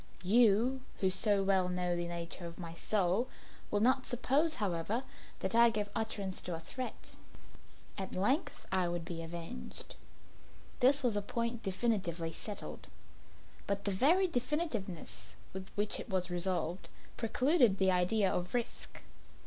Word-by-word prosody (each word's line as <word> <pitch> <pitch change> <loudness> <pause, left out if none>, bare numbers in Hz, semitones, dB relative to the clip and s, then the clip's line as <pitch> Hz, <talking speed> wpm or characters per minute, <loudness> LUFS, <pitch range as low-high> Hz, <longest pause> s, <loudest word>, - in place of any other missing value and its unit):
You, 230 +5 +4 0.2
who 190 -2 +2
so 200 0 +4
well 190 -2 +2
know 180 -1 0
the 175 0 -2
nature 170 0 -5
of 170 - -10
my 170 -2 -7
soul, 195 +5 +1 0.4
will 205 - +1
not 255 +3 +3
suppose, 285 +6 +2
however, 205 - -1 0.4
that - - -1
I 235 +1 +7
gave 210 -2 -2
utterance 205 -4 0
to 175 - -4
a - - -6
threat. 255 +9 -6 0.9
At 190 - -4
length 270 - 0
I 185 -2 +2
would 175 -1 -3
be 165 -1 -5
avenged; 170 +7 -7 0.9
this 275 +2 +5
was 240 -4 +2
a 205 - +1
point 235 +3 -2
definitely 185 -5 0
settled 205 +5 -6 0.8
but 200 0 -1
the 200 - +1
very 325 - +4
definitiveness 245 - -3 0.2
with 190 0 -6
which 205 0 +1
it - - -7
was 185 -1 -1
resolved, 175 0 0 0.3
precluded 245 - +3
the 190 -1 +4
idea 185 +2 +3
of 180 +5 -2
risk. 240 -1 -3
200 Hz, 145 wpm, -33 LUFS, 180-240 Hz, 0.9 s, I